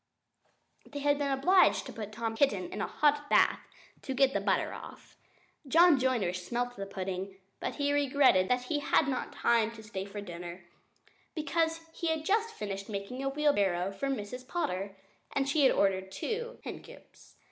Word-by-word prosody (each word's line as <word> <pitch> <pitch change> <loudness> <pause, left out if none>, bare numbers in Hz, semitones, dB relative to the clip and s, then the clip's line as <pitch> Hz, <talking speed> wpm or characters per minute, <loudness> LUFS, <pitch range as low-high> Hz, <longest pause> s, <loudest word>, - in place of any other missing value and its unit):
They 290 - -9
had 290 0 +2
been 285 -1 0
obliged 355 +8 +4
to - - -8
put 215 -2 -6
Tom 225 +1 -3
Kitten 210 -8 +1
into 210 - -2
a - - -6
hot 295 -1 +1
bath - - +4 0.4
to 265 - -4
get 270 0 +4
the - - +1
butter - - +1
off. - - -11 0.5
John 330 0 +6
Joiner 245 -9 +1
smelt 240 +7 -3
the 195 -2 -6
pudding; 190 0 -5 0.2
but - - -3
he 285 0 0
regretted 275 -9 +4
that 250 0 +2
he 290 +4 -1
had 290 0 +2
not 260 -2 -2
time 230 -2 +2
to 220 -1 -11
stay 195 -3 -5
to 205 +1 -7
dinner, 175 -1 -8 0.7
because 325 +1 0
he 335 - -3
had 320 -1 -1
just 435 +4 +2
finished 200 - -6
making 205 +5 -5
a 275 - 0
wheelbarrow 200 -11 +1
for 275 +8 -3
Miss 250 0 -4
Potter, 195 - -3 0.4
and 275 0 0
she 290 +2 +2
had 270 - +6
ordered 190 -1 +1
two 475 - -4
hen - - -6
coops. - - -17
250 Hz, 180 wpm, -30 LUFS, 195-290 Hz, 0.7 s, John